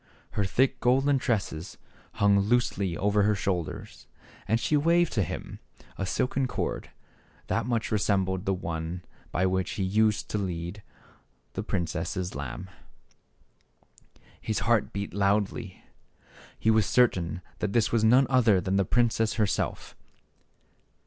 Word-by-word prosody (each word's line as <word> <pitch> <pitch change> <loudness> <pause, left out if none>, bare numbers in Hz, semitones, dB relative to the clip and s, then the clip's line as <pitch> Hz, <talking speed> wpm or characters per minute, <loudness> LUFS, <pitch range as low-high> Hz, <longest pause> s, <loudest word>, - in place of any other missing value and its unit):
Her 100 - 0
thick 130 +7 +1
golden 135 +3 +3
tresses 95 -8 -2 0.4
hung 100 -1 +4
loosely 100 -4 +1
over 105 +1 +2
her 105 +1 +3
shoulders, 90 -4 -4 0.4
and 115 - +2
she 150 - +1
waved 170 +3 +3
to 105 - +1
him - - -5 0.4
a 95 - -3
silken 130 +5 0
cord, - - -3 0.6
that 115 0 -1
much 115 -3 -1
resembled 95 -3 +1
the 95 - +3
one 85 0 -4 0.3
by 95 - +1
which 95 0 0
he 100 - -2
used 105 +3 +2
to 105 - 0
lead 90 +1 -4 0.7
the - - -3
princess' 90 +1 -2
lamb. 70 +7 -6 1.7
His 110 -2 -2
heart 115 -1 +2
beat 100 0 -4
loudly. 100 0 0 0.7
He 110 - +2
was 110 -2 +3
certain 90 -8 +2 0.2
that 105 -2 -2
this 115 -2 +2
was 115 -2 +2
none 125 +5 +6
other 120 -7 +4
than 95 +1 0
the 100 - +2
princess 115 0 +2
herself. 105 -3 -1
100 Hz, 135 wpm, -27 LUFS, 95-115 Hz, 1.7 s, none